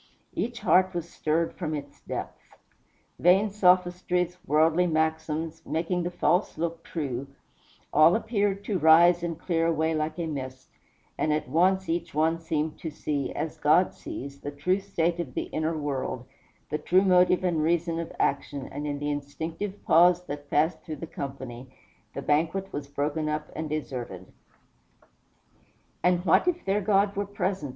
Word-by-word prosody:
Each 240 Hz, 0 st, -3 dB
heart 185 Hz, 0 st, +3 dB
was 170 Hz, -1 st, -3 dB
stirred 165 Hz, 0 st, -1 dB
from 155 Hz, -4 st, -3 dB
its 145 Hz, -1 st, -8 dB
depths. -, -, -6 dB, 0.8 s
Vain 190 Hz, +4 st, +4 dB
sophistries, 180 Hz, -2 st, +2 dB
worldly 160 Hz, +4 st, +3 dB
maxims, 160 Hz, 0 st, -1 dB
making 170 Hz, +3 st, -1 dB
the 175 Hz, -, -2 dB
false 175 Hz, +1 st, +1 dB
look 165 Hz, 0 st, -2 dB
true, 140 Hz, -5 st, -4 dB, 0.7 s
all 155 Hz, +4 st, +6 dB
appeared 205 Hz, -3 st, 0 dB
to 200 Hz, -4 st, -1 dB
rise 170 Hz, +2 st, +6 dB
and 170 Hz, -2 st, -3 dB
clear 165 Hz, -2 st, 0 dB
away 160 Hz, 0 st, +1 dB
like 155 Hz, +1 st, -2 dB
a 170 Hz, -, -2 dB
mist; 130 Hz, -4 st, -6 dB, 0.5 s
and 155 Hz, -, +1 dB
at 150 Hz, 0 st, 0 dB
once 185 Hz, +7 st, +2 dB
each 165 Hz, -2 st, -2 dB
one 160 Hz, +2 st, +2 dB
seemed 155 Hz, -1 st, -2 dB
to 160 Hz, -, -4 dB
see, 145 Hz, -2 st, -3 dB
as 160 Hz, -, -4 dB
God 155 Hz, +5 st, +4 dB
sees, 140 Hz, +1 st, -8 dB
the 145 Hz, -, -5 dB
true 145 Hz, +7 st, 0 dB
state 175 Hz, -3 st, -1 dB
of 170 Hz, -, -5 dB
the -, -, 0 dB
inner 160 Hz, +1 st, -1 dB
world, 135 Hz, -4 st, -3 dB, 0.5 s
the 150 Hz, -, -1 dB
true 185 Hz, +2 st, +3 dB
motive 180 Hz, -1 st, +4 dB
and 170 Hz, -4 st, +1 dB
reason 165 Hz, +1 st, +1 dB
of 165 Hz, -, -5 dB
action, 140 Hz, -1 st, -1 dB
and 145 Hz, +2 st, -4 dB
in 145 Hz, -1 st, -2 dB
the 145 Hz, +1 st, -2 dB
instinctive 160 Hz, +8 st, -5 dB
pause 175 Hz, +2 st, +5 dB
that 145 Hz, -1 st, -7 dB
passed 160 Hz, +4 st, +1 dB
through 155 Hz, -, -6 dB
the 160 Hz, -, -7 dB
company, 130 Hz, -4 st, -7 dB, 0.5 s
the 140 Hz, -, -4 dB
banquet 165 Hz, +6 st, 0 dB
was 145 Hz, -1 st, -4 dB
broken 150 Hz, +2 st, -2 dB
up 150 Hz, 0 st, -3 dB
and 155 Hz, -1 st, -4 dB
deserted. 125 Hz, -11 st, -5 dB, 1.8 s
"And 180 Hz, 0 st, +2 dB
what 170 Hz, -, +4 dB
if 350 Hz, -1 st, 0 dB
their 200 Hz, +2 st, +1 dB
God 200 Hz, 0 st, +2 dB
were 200 Hz, 0 st, -2 dB
present?" 185 Hz, -6 st, -2 dB
165 Hz, 160 wpm, -27 LUFS, 150-180 Hz, 1.8 s, all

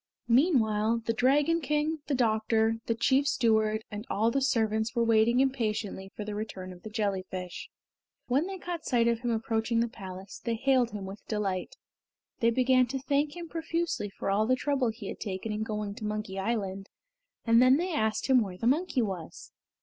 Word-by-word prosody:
Meanwhile 230 Hz, -5 st, +3 dB
the 230 Hz, -, +1 dB
Dragon 290 Hz, +8 st, +3 dB
King, 300 Hz, +2 st, 0 dB
the 285 Hz, -, +1 dB
doctor, 225 Hz, -1 st, +2 dB
the 230 Hz, -, +1 dB
chief 265 Hz, +5 st, +2 dB
steward, 220 Hz, -4 st, +2 dB
and 210 Hz, 0 st, -5 dB
all 225 Hz, +3 st, +2 dB
the 275 Hz, -, 0 dB
servants 220 Hz, -3 st, +1 dB
were 235 Hz, -, +3 dB
waiting 230 Hz, +2 st, +4 dB
impatiently 215 Hz, -7 st, -1 dB
for 210 Hz, -, -5 dB
the 210 Hz, -, -4 dB
return 195 Hz, -3 st, -6 dB
of 180 Hz, -, -15 dB
the 215 Hz, -, -8 dB
jellyfish. 190 Hz, -4 st, -3 dB, 0.6 s
When 275 Hz, +8 st, +1 dB
they 385 Hz, 0 st, -5 dB
caught 350 Hz, -2 st, -5 dB
sight 235 Hz, -2 st, +2 dB
of 235 Hz, -1 st, +2 dB
him 240 Hz, 0 st, -2 dB
approaching 225 Hz, 0 st, 0 dB
the 235 Hz, -, +2 dB
palace, 190 Hz, -3 st, -9 dB
they 235 Hz, -1 st, -1 dB
hailed 255 Hz, 0 st, +2 dB
him 205 Hz, -3 st, -6 dB
with 195 Hz, +2 st, -9 dB
delight. 195 Hz, -4 st, -2 dB, 0.6 s
They 230 Hz, -, +4 dB
began 255 Hz, +1 st, +3 dB
to 270 Hz, +3 st, -3 dB
thank 290 Hz, +3 st, 0 dB
him 345 Hz, -1 st, -7 dB
profusely 330 Hz, -8 st, -2 dB
for 195 Hz, -, -3 dB
all 215 Hz, +2 st, +2 dB
the 255 Hz, -, +4 dB
trouble 265 Hz, -2 st, 0 dB
he 220 Hz, -2 st, -7 dB
had -, -, -6 dB
taken 200 Hz, +1 st, -4 dB
in 210 Hz, 0 st, -3 dB
going 210 Hz, -2 st, -3 dB
to 210 Hz, -, -10 dB
Monkey 210 Hz, -2 st, -3 dB
Island, 195 Hz, -2 st, -2 dB, 0.6 s
and 230 Hz, 0 st, +5 dB
then 255 Hz, +2 st, +6 dB
they 355 Hz, +2 st, -2 dB
asked 220 Hz, -7 st, 0 dB
him 260 Hz, -2 st, +5 dB
where 190 Hz, -4 st, -4 dB
the 225 Hz, -, -4 dB
monkey 270 Hz, 0 st, +2 dB
was. 185 Hz, -6 st, -6 dB
225 Hz, 190 wpm, -29 LUFS, 210-260 Hz, 0.6 s, then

